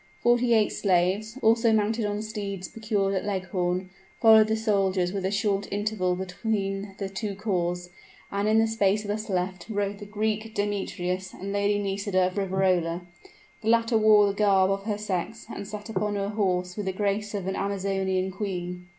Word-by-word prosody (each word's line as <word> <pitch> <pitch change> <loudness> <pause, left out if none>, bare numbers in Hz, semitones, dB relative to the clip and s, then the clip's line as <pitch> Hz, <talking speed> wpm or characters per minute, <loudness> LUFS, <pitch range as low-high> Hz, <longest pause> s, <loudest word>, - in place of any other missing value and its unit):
Forty 240 0 +3
eight 215 -1 +4
slaves, 195 +5 +1
also 230 +1 +4
mounted 220 +1 +1
on 205 +1 -2
steeds 200 -4 -5
procured 210 -3 -1
at 190 - -1
Leghorn, 185 -2 -2 0.3
followed 220 -1 +7
the 220 - +1
soldiers 195 -4 +1
with 195 -2 -2
a - - +2
short 200 -1 0
interval 200 -3 0
between 195 +1 -3
the 195 - -3
two 195 +1 -4
corps, 180 -4 -1 0.4
and 200 +1 0
in 215 +1 +4
the 225 - +5
space 210 -2 +1
thus 215 +1 -3
left, 185 -1 -2
rode 200 -1 -2
the 205 - -8
Greek 215 +1 -2
Demetrius 190 -2 -2
and 200 +1 -5
Lady 205 0 +2
Nisida 195 -2 0
of 185 +2 -3
Riverola. 185 -3 +1 0.6
The 220 - -1
latter 230 0 +3
wore 215 -1 +6
the 200 - +1
garb 195 -2 +3
of 195 0 -2
her 210 -2 -1
sex, 210 +2 -3
and 200 - -6
sat 210 0 -7
upon 210 -1 -1
her 200 0 -1
horse 180 -4 0
with 205 -2 -4
the 190 - 0
grace 205 +2 -1
of 195 -3 -3
an 190 0 -2
amazonian 195 -1 -1
queen. 180 -2 -4
200 Hz, 175 wpm, -26 LUFS, 190-215 Hz, 0.6 s, followed